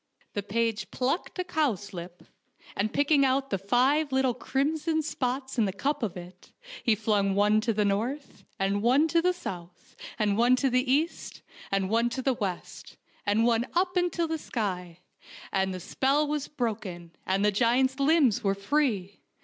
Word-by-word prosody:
The 205 - -2
page 215 0 -1
plucked 270 +11 -2
a 365 - 0
cowslip, 205 - -3 0.5
and 210 +2 0
picking 285 0 +3
out 270 +1 +1
the 195 - 0
five 265 - +2
little 265 -1 +2
crimson 310 +6 -1
spots 260 -2 -3
in 220 - +4
the 195 - -1
cup 280 +9 -2
of 210 -6 -3
it, 180 +1 -12 0.3
he 230 -3 +3
flung 205 -2 +1
one 210 +2 +3
to 230 +1 0
the 210 -1 +1
north, 235 +9 -2
and 195 +1 0
one 260 +7 +4
to 335 +2 +3
the 360 +2 +3
south, 180 - -9 0.2
and 210 -3 +1
one 245 +2 +5
to 265 0 0
the 255 +1 +1
east, 310 +5 -1 0.3
and 195 -1 +1
one 230 +3 +2
to 255 +2 -4
the 265 - +2
west, 195 -6 -6 0.3
and 215 +3 +3
one 235 +1 +2
up 365 +1 +1
into 355 -1 +1
the 320 -1 -3
sky, 180 - -4 0.5
and 190 0 0
the 185 - -5
spell 275 - +1
was 295 -1 -2
broken, 205 - -4 0.2
and 195 +2 +1
the 210 - +4
giant's 250 +5 +2
limbs 275 -6 +3
were 195 -1 +1
free. 200 -3 -1
235 Hz, 175 wpm, -28 LUFS, 200-280 Hz, 0.5 s, one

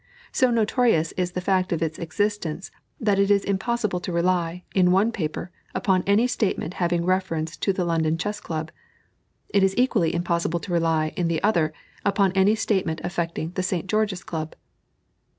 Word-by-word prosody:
So 255 - +3
notorious 225 - +2
is 180 -1 -2
the 180 - -2
fact 190 -1 +1
of 165 -1 0
its 160 -1 -3
existence 190 -1 -2 0.3
that 205 -3 +2
it 200 0 +3
is 200 -1 +3
impossible 205 -1 -1
to 180 - -5
rely, 175 0 0
in 180 -2 +4
one 200 +5 +3
paper, 175 -3 -4 0.2
upon 185 -2 +2
any 205 +4 +4
statement 210 -7 -1
having 170 -1 +1
reference 170 -3 0
to 195 - +1
the 185 -2 -1
London 165 -1 +1
Chess 205 +4 -3
Club; 160 -1 -4 0.8
it 200 - +3
is 195 0 +2
equally 215 -10 +2
impossible 170 0 0
to 180 - -5
rely, 165 -2 +1
in 175 - 0
the 165 0 -1
other, 170 -7 +2 0.3
upon 200 -1 +2
any 195 +3 +4
statement 190 -7 0
affecting 170 -2 -3
the 185 - -2
St. 185 -2 -1
George's 210 -2 0
Club. 160 -1 -5
180 Hz, 170 wpm, -24 LUFS, 165-200 Hz, 0.8 s, in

